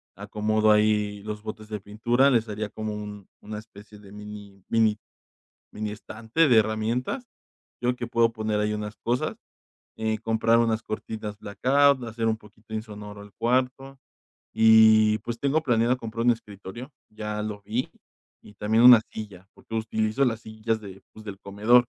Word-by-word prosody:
acomodo 105 +1 +1
ahí 105 -1 +2
los 105 0 -6
botes 110 0 -7
de 105 -2 -5
pintura, 120 +6 +2
les 115 -3 +2
haría 105 0 -4
como 110 0 -5
un 105 -2 -8
una 105 0 -6
especie 105 0 -14
de 100 -1 -15
mini 105 -2 -10
mini 110 -2 +3 0.7
mini 105 0 -4
estante 110 +8 0
de 120 - +5
herramientas. 110 - -1 0.5
Yo 125 +1 +1
que 120 - -4
puedo 115 -1 +3
poner 110 -1 -1
ahí 105 0 0
unas 105 0 -5
cosas. 120 +2 -1 0.6
Eh, 110 -1 -1
comprar 115 +1 +2
unas 115 -1 +1
cortinas 110 -1 -5
blackout, 135 +6 +3
hacer 115 0 -2
un 110 0 +1
poquito 110 +1 -16
insonoro 105 -2 -7
al 100 0 -14
cuarto, 130 +3 -1 0.6
y, 110 -1 +6
pues, 115 +2 -5
tengo 145 +3 +1
planeado 120 -2 +2
comprar 115 -1 -4
un 120 - +7
escritorio, 110 +3 -9 0.2
ya 105 0 -5
lo 105 -1 -5
vi, 115 +5 -2 0.5
y 105 - -15
también 110 +3 +2
una 125 -2 +10
silla, 100 -4 -8
porque 115 - -11
utilizo 110 +3 0
las 115 -3 0
sillas 110 0 -3
de, 100 -2 -10
pues, 110 - -13
del 100 -2 -7
comedor, 110 +5 +3
110 Hz, 160 wpm, -26 LUFS, 105-115 Hz, 0.7 s, una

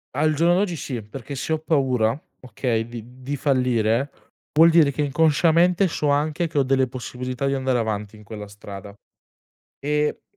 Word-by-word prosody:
Al 155 +2 +2
giorno 170 +3 +3
d'oggi 185 -2 0
sì, 125 -7 -5
perché 135 +6 -8
se 160 - -2
ho 160 - 0
paura, 130 -6 +1 0.2
okay, 120 -3 -2
di 120 +2 -10
di 140 +3 -3
fallire, 125 -2 +1 0.5
vuol 165 +2 +7
dire 160 -3 +5
che 150 +2 -1
inconsciamente, 165 +5 +3
so 150 -3 -1
anche 155 +4 +1
che 150 - -6
ho 140 - +4
delle 130 0 +2
possibilità 125 +2 -5
di 135 - +1
andare 130 -2 0
avanti 105 -2 -3
in 105 - -15
quella 105 -1 -8
strada. 100 -1 -10 0.9
E, 150 +1 -1
135 Hz, 170 wpm, -23 LUFS, 120-155 Hz, 0.9 s, vuol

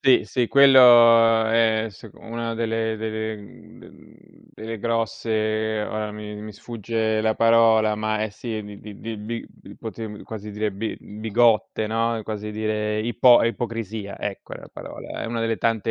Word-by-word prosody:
Sì, 130 - +4
sì, 125 -2 -1
quello, 120 -4 +7
ehm, 115 -1 +2
s 100 +1 -14
una 115 0 -5
delle 115 -1 -1
delle 110 0 -4
mhmm, 100 -1 -15
d - - -19
delle 110 +1 -7
grosse, 110 -1 -1
ora 105 -1 -4
mi 105 0 -8
mi 110 0 -8
sfugge 110 0 -2
la 110 0 +1
parola, 115 -2 +4
ma 110 0 -1
è 110 - -1
sì, 110 +1 -6 0.2
di 105 -1 -11
di 115 +1 -6
di - - -16
quoti 110 -2 -7
quasi 105 -1 -8
direbbe 105 +1 -3
bi 105 - -12
bigotte, 110 0 +2
no? 115 +1 0
È 110 - -5
quasi 105 0 -5
dire 105 0 -2
ipo 120 +2 +5
ipocrisia, 115 -3 -4
ecco 100 -2 -6
è - - -6
la - - -13
parola - - -8
è - - -4
una 115 0 -3
delle 115 0 0
tante 115 -1 0
110 Hz, 160 wpm, -23 LUFS, 110-115 Hz, 0.2 s, quello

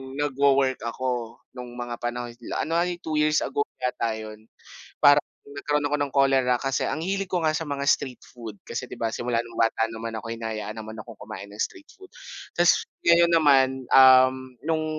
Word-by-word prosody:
nagwo-work 140 -2 +2
ako, 120 -1 -4 0.2
nung 125 -1 -8
mga 120 -1 -5
panahon 120 0 -4 0.2
la - - -2
ano 165 +2 -1
nga 175 - +2
'yon 175 -1 -5
2 155 -1 -2
years 150 0 +2
ago 430 0 -1 0.2
yata 115 -3 -1
'yon. 110 0 -9 0.5
Parang 145 0 +6 0.2
nagkaroon 145 +1 -2
ako 150 - 0
ng 140 -1 -1
cholera 135 -2 +3
kasi 135 -1 -1
ang 155 - -3
hilig 195 0 -2
ko 180 - +1
nga 155 - +2
sa 160 - -2
mga 140 0 -3
street 130 -3 +1
food 115 -4 -9
kasi - - -5
di - - -9
ba, 115 -1 -1
simula 120 -1 -1
nung 115 - -13
bata 115 0 +2
naman 115 0 -6
ako 115 +1 -5
hinahayaan 110 -2 -5
naman 110 0 -8
akong 115 0 -10
kumain 105 -1 -8
ng 105 +1 -7
street 325 -5 -4
food. 385 -1 -15 0.5
Tapos - - +4 0.2
ngayon 170 - +5
naman, 145 -5 +5 0.3
um, 130 0 +7 0.3
nung 160 -1 0
130 Hz, 190 wpm, -25 LUFS, 115-150 Hz, 0.5 s, um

